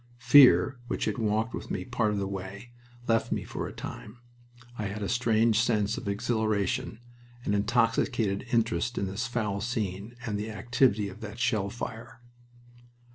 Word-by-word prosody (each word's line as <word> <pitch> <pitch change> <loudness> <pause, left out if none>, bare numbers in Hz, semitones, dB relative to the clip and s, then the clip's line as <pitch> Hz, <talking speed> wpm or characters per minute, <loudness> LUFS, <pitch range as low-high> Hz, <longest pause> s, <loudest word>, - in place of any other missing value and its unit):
Fear, 130 0 +6
which - - -2
had 110 +2 -2
walked 110 +1 0
with - - -6
me - - -3
part 120 -3 0
of 105 - -1
the 100 -1 -1
way, 100 +4 -7 0.4
left 115 -1 +1
me - - -1
for - - -5
a - - -7
time. 105 +3 -8 0.6
I 110 - -4
had 100 +1 -4
a - - -1
strange 115 -2 +2
sense 110 -2 +1
of 120 - -6
exhilaration, 110 +3 -1 0.4
an 100 - 0
intoxicated 115 0 +1
interest 115 0 +1
in 100 - 0
this 100 +7 -3
foul 105 -5 -2
scene 105 -1 -3
and 105 -4 -2
the 105 +2 -4
activity 110 -1 +1
of 100 +3 -10
that 110 0 -7
shell 110 -5 0
fire. 120 +3 -7
110 Hz, 165 wpm, -28 LUFS, 100-120 Hz, 0.6 s, Fear